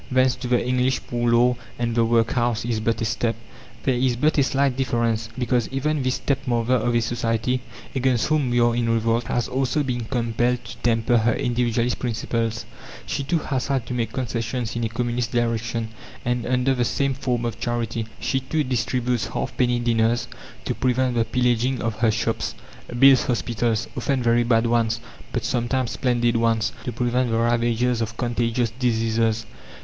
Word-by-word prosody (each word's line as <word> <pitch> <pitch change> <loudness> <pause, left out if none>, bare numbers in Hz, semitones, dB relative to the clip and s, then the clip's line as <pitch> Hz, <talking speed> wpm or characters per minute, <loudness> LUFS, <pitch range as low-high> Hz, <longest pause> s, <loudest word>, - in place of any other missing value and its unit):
Thence 130 0 +3
to 125 0 -5
the 120 -1 +2
English 125 0 +1
poor 120 0 0
law 120 +1 +4 0.2
and 120 -1 -1
the 115 0 +3
workhouse 115 0 +1
is 115 -2 -1
but 115 +1 0
a - - 0
step. 115 +1 0 0.5
There 130 - +2
is 125 0 +1
but 150 +6 +2
a - - +6
slight 135 -1 +1
difference, 115 -3 0
because 125 -2 +1
even 145 +3 -1
this 130 0 0
stepmother 125 -3 0
of 120 -1 +1
a 120 - +3
society 115 +2 -1 0.3
against 130 -3 +1
whom 150 -4 +1
we 120 0 +2
are 120 0 +3
in 120 -1 0
revolt 115 +1 +1
has 120 - -1
also 135 +3 0
been 120 -3 -2
compelled 120 0 0
to - - -9
temper 115 0 +2
her 115 +1 +2
individualist 120 0 0
principles; 115 -1 -2 0.4
she, 105 - -2
too, 145 +5 +1
has 135 -4 -2
had 135 -4 0
to - - -5
make 120 -2 -1
concessions 120 -1 -3
in 115 - -1
a - - -1
communist 120 +1 -2
direction 115 -1 -1 0.4
and 120 -1 -1
under 130 +1 +2
the 125 -2 +1
same 135 +3 0
form 125 -3 -2
of 115 - -4
charity. 115 -1 -2
She, 135 - 0
too, 150 +4 -1
distributes 125 -1 -1
halfpenny 125 -1 0
dinners 115 0 +1 0.4
to - - 0
prevent 130 0 +1
the 115 -1 +1
pillaging 125 +1 +1
of 110 0 -3
her 115 -1 +4
shops; 110 +1 -1 0.4
builds 135 +1 +7
hospitals 120 -2 0
often 135 -3 0
very 120 0 +3
bad 115 -1 +3
ones, 115 -1 +1 0.3
but - - -2
sometimes 125 +1 0
splendid 120 -2 +1
ones 115 -1 +1
to 125 - -2
prevent 125 +1 0
the 115 - +1
ravages 120 +1 +1
of 115 +1 -3
contagious 120 -1 0
diseases. 115 -2 0
120 Hz, 175 wpm, -23 LUFS, 115-125 Hz, 0.5 s, builds